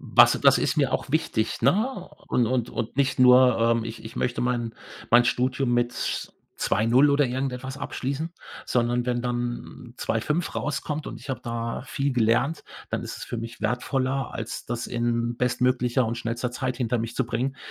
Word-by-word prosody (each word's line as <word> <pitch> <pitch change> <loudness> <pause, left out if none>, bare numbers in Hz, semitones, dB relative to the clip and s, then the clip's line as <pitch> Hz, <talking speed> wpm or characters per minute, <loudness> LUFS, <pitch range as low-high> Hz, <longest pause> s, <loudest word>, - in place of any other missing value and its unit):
Was - - +6
das - - +6
ist - - 0
mir - - +2
auch - - -2
wichtig, 155 -8 0
ne? 190 - +1 0.2
Und 120 - +2
und 120 0 0
und 115 - -4
nicht 140 -1 +1
nur, 125 -1 +7
ähm, 115 0 +2
ich 115 0 -7
ich 110 - -9
möchte 125 - -1
mein 120 -2 -1 0.4
mein 120 0 +7
Studium 125 +1 +1
mit 120 0 +1 0.6
2,0 120 +8 +3
oder 145 +1 +4
irgendetwas 130 +1 -3
abschließen, 140 +4 -3 0.3
sondern 120 0 0
wenn 120 -1 0
dann 120 0 -4
2,5 150 +9 -1
rauskommt 150 +1 -3
und - - -8
ich - - -7
habe 130 - -3
da 115 0 -3
viel 140 +1 -2
gelernt, 120 +6 +2 0.3
dann - - -2
ist - - -6
es - - -7
für - - -5
mich 115 +1 -7
wertvoller, 130 +1 -1
als 115 +1 -5
das 120 -1 -3
in 120 0 -1
bestmöglicher 125 0 +1
und 115 +1 -2
schnellster 120 +1 -2
Zeit 130 0 -2
hinter 125 -1 0
mich 115 +1 -4
zu 135 - +1
bringen, 130 +3 -2
125 Hz, 175 wpm, -25 LUFS, 120-135 Hz, 0.6 s, nur